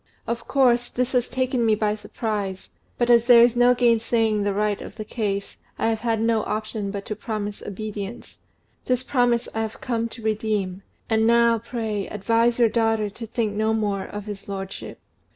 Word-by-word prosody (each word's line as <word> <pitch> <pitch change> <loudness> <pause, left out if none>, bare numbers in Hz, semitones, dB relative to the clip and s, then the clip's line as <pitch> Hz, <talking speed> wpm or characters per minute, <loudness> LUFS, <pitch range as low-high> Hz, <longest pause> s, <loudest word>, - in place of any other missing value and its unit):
Of 235 0 -4
course, 245 -3 +3
this 250 +1 -1
has 250 -2 +1
taken 255 -1 0
me 220 -1 +4
by 210 0 0
surprise; 210 -3 -4 0.3
but 240 0 +2
as 235 -1 +5
there 240 -1 +8
is 240 0 +4
no 245 +1 +5
gainsaying 230 -2 +2
the 205 0 +1
right 210 0 0
of - - -9
the 215 - -6
case, 200 -3 -3 0.2
I - - +1
have 225 -1 0
had 225 -1 0
no 225 0 +2
option 215 -1 -3
but 200 0 -5
to 215 - -4
promise 210 -1 -4
obedience: 210 +1 -7 0.5
this 255 0 +1
promise 245 -3 +1
I 225 - -1
have 220 0 -4
come 230 -2 -2
to 230 0 -10
redeem; 210 -3 -1 0.3
and 220 0 +2
now, 235 0 +4
pray, 220 -3 -3
advise 230 +3 +1
your 235 -2 +5
daughter 225 -2 +1
to 230 +3 -8
think 220 -2 -1
no 220 +1 +1
more 205 -3 -1
of 205 -1 -7
his 205 -2 -8
lordship." 195 -1 -6
220 Hz, 190 wpm, -24 LUFS, 210-235 Hz, 0.5 s, there